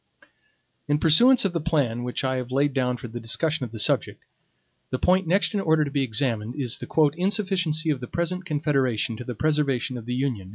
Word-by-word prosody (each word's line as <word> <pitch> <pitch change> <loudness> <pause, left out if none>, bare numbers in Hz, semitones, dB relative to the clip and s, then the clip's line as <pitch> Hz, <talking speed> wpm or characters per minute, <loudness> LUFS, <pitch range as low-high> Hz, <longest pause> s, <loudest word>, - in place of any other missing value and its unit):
In 145 - +2
pursuance 215 - +5
of 190 - 0
the 170 - -1
plan 140 -8 0
which 125 +2 -3
I 130 0 0
have 125 0 -5
laid 140 +2 +1
down 125 -2 0
for 120 - -8
the 120 +1 -7
discussion 150 +6 -1
of 115 - -10
the 115 - -8
subject, 105 - 0 0.6
the 130 - -2
point 185 +5 +2
next 195 +6 +2
in 205 - 0
order 160 -5 +2
to 140 - -6
be 140 -1 0
examined 115 -2 -1
is 130 -4 -2
the 150 -3 +1
"insufficiency 180 -5 0
of 140 - -2
the 125 - -7
present 180 +5 -3
Confederation 135 - 0
to 125 - -7
the 125 0 -6
preservation 135 -3 0
of 115 - -13
the 125 - -2
Union." 125 -8 -3
140 Hz, 210 wpm, -24 LUFS, 125-160 Hz, 0.6 s, pursuance